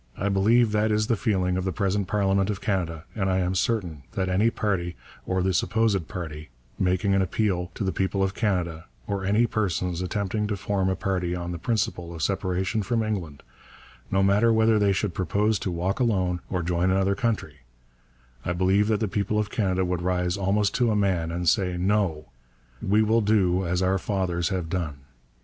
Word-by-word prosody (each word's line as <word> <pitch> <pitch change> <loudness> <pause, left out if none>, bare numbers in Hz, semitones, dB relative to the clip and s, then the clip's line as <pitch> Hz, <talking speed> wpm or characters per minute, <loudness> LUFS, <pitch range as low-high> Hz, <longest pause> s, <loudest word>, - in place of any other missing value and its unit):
I 100 - -1
believe 110 +4 +3
that 105 +1 +2
is 105 0 +2
the 115 - +1
feeling 95 -5 0
of 95 - -1
the 95 - -1
present 100 +2 -1
Parliament 100 -1 +1
of 100 -2 -2
Canada, 85 -7 -2
and 95 -3 -1
I 95 - +2
am 90 0 0
certain 90 -6 -1
that 95 -1 -1
any 100 +5 +3
party, 90 -6 -2 0.3
or 95 -1 0
the 95 0 +1
supposed 105 -2 +1
party, 80 -4 -6 0.3
making 95 +2 +1
an 95 - +3
appeal 95 -1 0
to - - -3
the 95 - 0
people 95 +2 0
of 95 0 0
Canada, 90 -6 -1 0.2
or 100 -2 -3
any 105 +5 +3
persons 90 -5 -1
attempting 100 +3 -1
to 105 -1 -2
form 95 -1 0
a 95 - 0
party 95 -3 -1
on 85 0 -4
the 85 - -5
principle 90 -4 -2
of 80 - -4
separation 95 +2 0
from 115 +3 0
England, 90 -10 -4 0.7
no 95 0 +2
matter 105 +4 +4
whether 110 -1 +4
they 100 -1 +3
should 95 -1 -1
propose 100 +4 +1
to - - -3
walk 90 +5 -2
alone, 95 -7 +1
or 90 -2 -1
join 90 +2 +1
another 95 +1 +2
country, 100 - -2 0.9
I 90 - -1
believe 95 +3 +2
that 110 -1 +1
the 110 - +1
people 100 +2 -1
of 105 -1 -1
Canada 95 -3 0
would 90 -1 -2
rise 90 0 0
almost 100 +1 +1
to 120 -2 +2
a 110 - +1
man 90 -5 +1
and 85 +1 -3
say, 90 +1 +2
'No, 90 -7 0 0.5
we 105 +3 +3
will 110 +2 +3
do 95 -4 +2
as 90 +2 0
our 95 +1 +2
fathers 90 -3 -1
have 90 -4 -2
done. 80 -5 -3
95 Hz, 195 wpm, -25 LUFS, 90-105 Hz, 0.9 s, matter